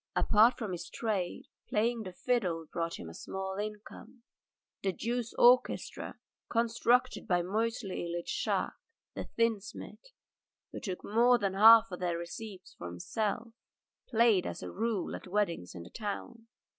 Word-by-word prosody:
Apart 220 +4 +5
from 220 -6 -4
his 175 -1 -5
trade, 205 -6 -2 0.3
playing 230 +2 +1
the 190 -4 -6
fiddle 180 -6 -1
brought 165 0 -2
him - - -8
in 80 - -8
a - - -12
small 190 - -5
income. 210 +3 -7 0.6
The 190 -1 0
Jews' 235 +3 -3
orchestra 250 +1 +3 0.3
conducted 235 +2 +2
by 175 -3 +2
Moisey 220 +4 -1 0.2
Ilyitch 170 0 -4
Shahkes, - - -1 0.3
the - - -5
tinsmith, 230 - -2 0.6
who - - -6
took 185 -3 -5
more 240 +4 +5
than 195 -4 -1
half 225 +3 +8
their 175 -2 -1
receipts 190 +2 -8
for 85 - -7
himself, 205 - -2 0.6
played 225 -6 +4
as - - -6
a - - -5
rule 220 -3 -1
at - - -9
weddings 180 - -1
in 85 - -7
the - - -13
town. 225 +2 -6
210 Hz, 145 wpm, -31 LUFS, 180-230 Hz, 0.6 s, half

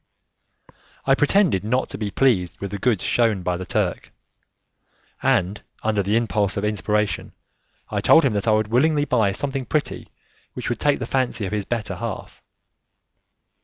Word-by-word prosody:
I 135 - +4
pretended 150 - +3
not 125 +5 0
to - - -6
be 105 -2 -2
pleased 100 -7 +1
with 100 -1 -5
the 100 - -4
goods 115 -3 +1
shewn 110 -6 +1
by 90 0 0
the 90 +1 -6
Turk, - - -1 1.1
and 95 +4 +1 0.2
under 110 -2 +1
the 100 +3 +1
impulse 105 -3 0
of 100 - -1
inspiration 105 0 -1 0.5
I - - -2
told 165 -2 +6
him 125 - +2
that 105 +2 -2
I - - +5
would 110 0 +1
willingly 145 +5 +2
buy 115 -7 +2
something 135 +4 -3
pretty 155 -2 -2 0.5
which - - -4
would 120 - -2
take 145 -1 +2
the 125 - -4
fancy 125 -4 -1
of 95 - -4
his 105 -2 -2
better 115 -3 -2
half. - - -6
110 Hz, 165 wpm, -22 LUFS, 100-130 Hz, 1.1 s, told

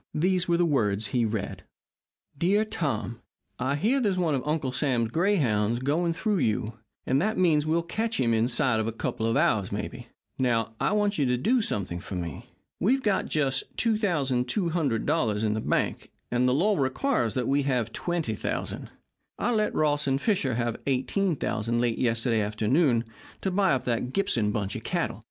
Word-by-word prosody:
These 180 +3 +2
were 170 -1 +2
the 175 - +3
words 110 -9 +1
he 120 -2 +2
read: 110 -2 -3 0.7
DEAR 195 +8 +2
TOM: 135 - -3 0.4
I 130 +3 0
hear 225 - +2
there's 200 -5 +1
one 170 -4 +1
of 135 - 0
Uncle 150 -4 0
Sam's 120 -3 0
grayhounds 120 - +2
going 155 +7 0
through 210 +2 0
you, 110 -2 -1 0.3
and 135 +2 +2
that 215 +4 0
means 160 -5 +3
that - - -3
we'll 165 +1 +2
catch 225 +6 -2
him 115 -3 +2
inside 120 +1 +1
of 110 - -1
a - - -1
couple 110 0 -2
of 115 - +1
hours, 100 -3 +2
maybe. 120 +4 -5 0.3
Now, 115 -3 +1
I - - +1
want 205 -3 +1
you 140 - +2
to 125 0 +1
do 235 - +2
something 95 - -2
for 95 - -7
me. 85 -4 -5 0.3
We've 260 +7 +2
got 205 -3 +1
just 135 -3 0
$2,200 145 - 0
in 105 -1 +1
the 110 - -2
bank, - - -1 0.2
and 125 +1 +2
the - - +2
law 200 +6 +2
requires 135 - 0
that 125 -2 -1
we 140 +1 +2
have 120 -4 0
$20,000. 165 - -3 0.5
I 245 - 0
let 215 -1 0
Ross 150 -1 +1
and 135 0 +1
Fisher 150 - 0
have 120 -1 -2
$18,000 130 - 0
late 120 -1 0
yesterday 115 -1 +1
afternoon 115 +5 +2 0.4
to 190 - -1
buy 190 -4 +3
up 130 - -1
that 125 +1 -1
Gibson 115 - +1
bunch 100 -2 -2
of - - -6
cattle. - - -2
135 Hz, 180 wpm, -27 LUFS, 115-175 Hz, 0.7 s, the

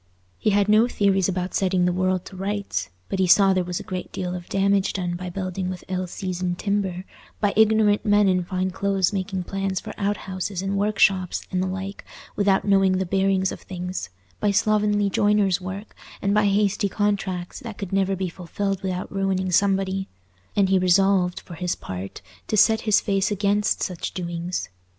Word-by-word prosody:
He - - +1
had 205 -1 +3
no 215 +3 +5
theories 195 -5 +2
about 180 0 -2
setting 185 -2 +2
the 180 - +2
world 185 0 0
to - - -10
rights, 195 - -3 0.2
but 195 - -3
he 185 - +3
saw 195 +2 +6
there 185 -1 +1
was 175 0 -3
a - - -7
great 185 -1 -5
deal 180 -1 -3
of 175 -1 -7
damage 195 0 +2
done 180 -2 -2
by 180 +1 -5
building 185 0 -3
with 185 -1 -6
ill 185 0 -2
seasoned 180 -1 -3
timber—by 200 +1 -3
ignorant 215 -1 +4
men 205 -1 +4
in 185 -1 +2
fine 185 +1 -2
clothes 195 0 0
making 190 -1 -2
plans 195 0 -2
for - - -8
outhouses 190 -2 -2
and 195 +1 -1
workshops 195 -3 +2
and 185 -1 0
the 185 - 0
like 190 +1 -5 0.3
without 200 -1 +2
knowing 195 -2 +4
the 190 - -1
bearings 190 0 +1
of - - -7
things—by 95 - -5
slovenly 205 0 +2
joiners' 200 -2 +2
work, 190 +3 -7 0.2
and 200 0 0
by 210 0 +3
hasty 200 0 +1
contracts 195 -3 -2
that 230 -6 -8
could 195 -2 -6
never 195 0 +2
be 185 0 -2
fulfilled 190 +3 -3
without 185 -1 -4
ruining 190 -1 0
somebody; 195 0 +1 0.5
and 195 -2 +3
he 190 -1 +4
resolved, 185 0 +3
for - - -11
his 175 +1 -2
part, 95 0 -7 0.2
to 215 - 0
set 220 +2 +5
his 210 - +6
face 195 -1 0
against 205 0 +1
such 180 -4 -4
doings. 175 0 -3
190 Hz, 180 wpm, -24 LUFS, 180-200 Hz, 0.5 s, saw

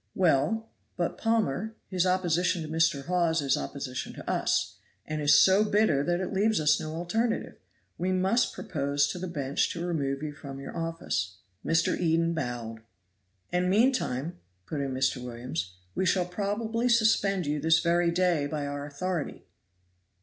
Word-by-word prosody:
"Well, 190 +6 +2 0.3
but, - - -1
Palmer, 220 -2 0
his 185 -1 +1
opposition 180 -1 +1
to - - -6
Mr. 160 -3 +1
Hawes 170 -2 +2
is 140 -2 +2
opposition 70 - -5
to - - -10
us, - - 0 0.3
and 155 0 -3
is 145 0 +6
so 195 +2 +6
bitter 205 -9 +2
that 175 +2 0
it 185 0 -3
leaves 210 +1 +2
us 150 0 +3
no 155 0 -5
alternative. 220 +8 -1 0.4
We 185 +2 0
must 190 +6 +2
propose 145 -7 0
to 180 - -4
the 185 - -4
bench 140 -5 -1
to 170 0 -4
remove 140 -5 -1
you 150 -1 -4
from 140 -2 -9
your 135 - -8
office." 165 - -2 0.3
Mr. 165 0 +2
Eden 165 0 +1
bowed. 120 -7 -4 0.7
"And 180 +1 +1
meantime," 185 - +1 0.3
put 145 - -3
in 135 -1 -2
Mr. 130 -1 0
Williams, 115 -8 -5 0.2
"we 190 - 0
shall 180 0 +2
probably 220 +6 -1
suspend 210 -5 +3
you 150 +1 -1
this 160 +2 +4
very 170 0 +2
day 170 -4 +2
by 145 -1 -3
our 145 0 -4
authority." 165 +3 -4
165 Hz, 160 wpm, -28 LUFS, 145-185 Hz, 0.7 s, is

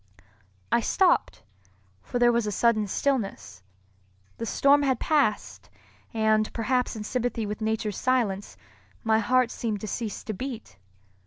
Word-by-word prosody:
I - - +4
stopped, 350 - +1 0.6
for 245 - -4
there 240 0 +5
was 235 -2 0
a - - -1
sudden 215 0 +2
stillness. 195 - -2 0.8
The 230 - -3
storm 280 +4 +4
had 265 -4 +1
passed; 285 -9 0 0.4
and, 220 -1 +2
perhaps 250 +2 0
in 215 - -5
sympathy 240 -1 -2
with 210 +1 -5
nature's 220 -2 -1
silence, 230 -7 0 0.5
my 220 0 +3
heart 250 +2 +2
seemed 220 -3 -3
to 215 - -5
cease 220 0 -4
to 215 - -4
beat. 235 - -7
225 Hz, 140 wpm, -26 LUFS, 210-250 Hz, 0.8 s, there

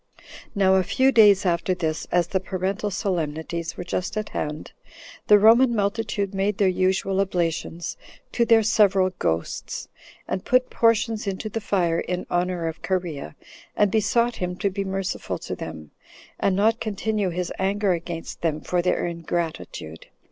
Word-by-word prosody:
6. - - -21 0.3
Now, 190 -1 +4
a - - +4
few 260 +8 +2
days 205 -5 +6
after 175 +1 +1
this, 160 -3 -2
as 175 -1 +3
the 190 +3 -1
Parental 190 +2 -2
solemnities 165 -3 -3
were - - -4
just 185 +3 -3
at 215 - -3
hand, 150 0 -4 0.6
the 210 - +8
Roman 235 +4 +6
multitude 205 -1 -1
made 195 +1 0
their 200 - +3
usual 190 +1 +1
oblations 170 -2 -2 0.3
to 240 - +2
their 230 -1 +5
several 200 -4 +3
ghosts, 80 +1 -2 0.4
and 185 - -3
put 255 0 +2
portions 230 -2 +2
into 195 +2 -3
the 225 +2 -4
fire 175 -5 +1
in 180 0 -3
honor 175 -1 0
of 160 0 -6
Cherea, 170 - -3 0.4
and 205 -2 +3
besought 230 +3 +1
him 180 0 -3
to 200 +1 -1
be 200 +1 -2
merciful 195 0 -3
to - - -6
them, 80 -2 -8 0.5
and 190 - +2
not 220 +4 +2
continue 215 -1 -1
his 180 0 -3
anger 200 +1 +1
against 170 -1 -6
them 155 -2 0
for 175 +2 -1
their 180 - 0
ingratitude. 165 - -4
190 Hz, 160 wpm, -24 LUFS, 170-210 Hz, 0.6 s, the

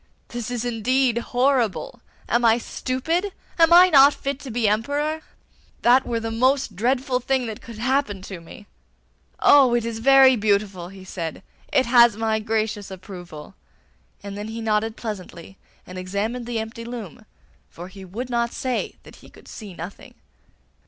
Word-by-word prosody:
This 240 -2 -5
is 245 -1 -3
indeed 245 +1 +1
horrible! 255 - 0 0.3
Am 240 +1 +1
I 230 0 +5
stupid? 320 - -2 0.3
Am 330 0 +6
I 360 +2 +8
not 280 0 +7
fit 275 0 -4
to 275 - -9
be 230 -1 0
Emperor? 285 +9 -1 0.6
That 255 +2 +5
were 235 -1 -1
the 225 0 -4
most 255 -1 +1
dreadful 250 +4 0
thing 260 0 0
that 220 -2 -6
could 230 -2 -11
happen 240 -5 -1
to 190 -2 -8
me. 165 +5 -13 0.7
Oh, 265 -4 +6
it 235 -1 0
is 230 -1 -4
very 265 +1 +6
beautiful,' 200 -4 0
he 195 0 -12
said. 165 -4 -6 0.3
'It 265 -2 +3
has 235 -2 +5
my 220 -1 0
gracious 215 -1 -2
approval.' 180 -5 -10 0.7
And 200 0 -7
then 205 +1 -6
he 225 +1 -6
nodded 220 0 -1
pleasantly, 195 -4 -8 0.3
and 185 0 -8
examined 210 +6 -3
the 240 -1 -3
empty 225 +1 -5
loom, 225 -3 -8 0.4
for 175 +2 -10
he 190 +1 -12
would 230 +8 -6
not 235 0 0
say 255 -1 -3
that - - -15
he - - -16
could - - -18
see 205 -5 -10
nothing. 175 +4 -9
230 Hz, 165 wpm, -23 LUFS, 205-255 Hz, 0.7 s, I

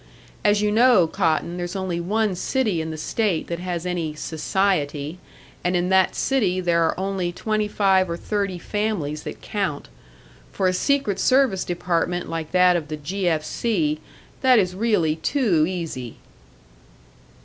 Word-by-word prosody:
As 205 0 +3
you 210 - +2
know, 230 -4 +5
Cotton, 170 0 0
there's 175 +1 -4
only 185 -3 -2
one 210 +4 0
city 205 -1 0
in 160 - -4
the 160 - -5
state 190 +2 -1
that 170 0 -3
has 175 -1 -4
any 170 -4 -2
'society,' 160 -2 -1 0.4
and 180 +1 +1
in 175 +1 +1
that 190 -1 +3
city 205 -9 +1
there 170 -2 +2
are 165 - 0
only 190 -2 -1
twenty 215 +3 -1
five 190 -3 +2
or 170 - -3
thirty 200 -1 -2
families 175 -6 -2
that - - -8
count. 190 -9 -3 0.6
For 190 - 0
a 185 - +2
secret 270 -1 +1
service 255 -8 +3
department 175 0 -1
like 165 -2 -4
that 180 -1 +5
of 165 -3 -2
the 155 0 -5
'G. 180 +6 -3
F. 155 -2 0
C.', 155 -6 0 0.4
that 255 -2 +5
is 185 -4 +2
really 185 -7 +1
too 170 - +2
easy." 165 -10 -5
180 Hz, 160 wpm, -23 LUFS, 165-205 Hz, 0.6 s, know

